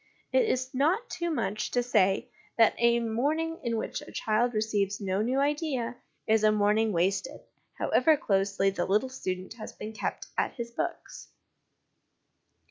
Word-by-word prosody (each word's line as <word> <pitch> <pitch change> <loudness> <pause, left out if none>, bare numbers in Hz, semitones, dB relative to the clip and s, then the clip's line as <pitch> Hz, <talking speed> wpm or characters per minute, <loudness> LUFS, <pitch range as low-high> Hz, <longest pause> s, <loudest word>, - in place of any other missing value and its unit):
It - - +4
is 260 - -1
not 335 - +1
too 345 0 -2
much 215 -8 -1
to 245 - +1
say 215 0 +2 0.3
that 225 -2 +6
a 235 0 +4
morning 295 +9 -1
in 230 -2 -1
which - - -3
a - - -11
child 225 +2 0
receives 210 -2 0
no 195 -1 -1
new 255 +5 +1
idea 280 -4 -1 0.3
is 220 0 +3
a 215 - +6
morning 215 +1 +2
wasted, 195 - 0 0.4
however 310 +4 +3
closely 195 -3 +1
the 175 -2 -2
little 215 +7 +2
student 185 -7 -5
has 215 - -7
been 215 +1 -7
kept - - -4
at - - 0
his 235 -1 -5
books. 345 +8 -5
230 Hz, 155 wpm, -28 LUFS, 205-260 Hz, 0.4 s, that